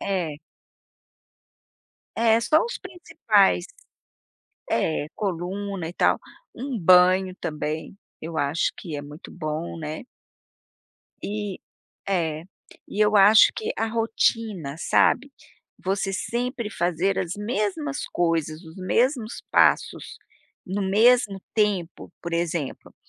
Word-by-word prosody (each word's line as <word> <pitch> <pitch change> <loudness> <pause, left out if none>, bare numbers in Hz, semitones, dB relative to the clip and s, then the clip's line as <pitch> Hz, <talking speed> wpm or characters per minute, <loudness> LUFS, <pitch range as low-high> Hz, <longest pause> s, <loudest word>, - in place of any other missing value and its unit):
É. 175 -7 -2 1.8
É, 225 -1 +4
só 305 +7 +3
os 475 - -5
principais. 355 -2 +1 1.0
É, 155 -2 0
coluna 190 -1 -3
e 170 - -7
tal, - - +2 0.4
um 255 -1 -4
banho 185 +1 +5
também, 155 +3 -4 0.2
eu 160 0 -5
acho 145 +3 0
que 160 -5 -6
é 145 - -5
muito 150 +3 -11
bom, 155 0 -4
né. 155 +7 -6 1.2
E, 205 -2 -4 0.5
é, 160 -4 -1 0.4
e 205 - -4
eu 210 0 +4
acho 205 +2 +7
que 450 0 -2
a - - 0
rotina, 225 -8 -1
sabe, 275 +10 +2 0.5
você 195 +1 -1
sempre 235 +3 -3
fazer 180 +2 0
as 180 -1 -2
mesmas 235 +7 -2
coisas, 165 -2 0
os 160 +2 -13
mesmos 230 +5 0
passos, - - +2 0.5
no 195 +2 -2
mesmo 215 0 +4
tempo 195 -6 -1
por 170 -1 -5
exemplo, 170 -4 -3
190 Hz, 110 wpm, -24 LUFS, 165-220 Hz, 1.8 s, acho